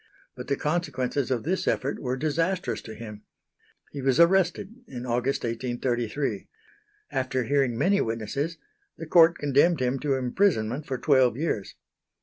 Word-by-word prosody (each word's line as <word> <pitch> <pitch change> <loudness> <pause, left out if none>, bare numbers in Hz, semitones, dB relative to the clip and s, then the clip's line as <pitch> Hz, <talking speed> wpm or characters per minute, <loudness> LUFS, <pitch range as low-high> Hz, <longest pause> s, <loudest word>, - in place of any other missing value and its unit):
But - - -8
the 140 - +1
consequences 145 -4 -1
of 125 -4 -1
this 185 +5 -1
effort 135 +2 0
were 125 -1 -2
disastrous 155 - -1
to 110 - -9
him. 105 -2 -9 0.7
He 140 - -6
was 135 +2 +2
arrested 185 +5 +3
in 125 -6 -7
August, 125 +3 -1
1833. 120 -1 -2 0.6
After 130 -1 -1
hearing 135 -2 +1
many 200 +9 +3
witnesses 115 +9 -3 0.4
the 165 - -6
Court 165 +1 +5
condemned 145 +3 +3
him 130 +1 0
to 140 -1 0
imprisonment 130 - 0
for 130 -2 -2
twelve 130 -4 +3
years. 140 -10 -2
135 Hz, 140 wpm, -26 LUFS, 120-160 Hz, 0.7 s, Court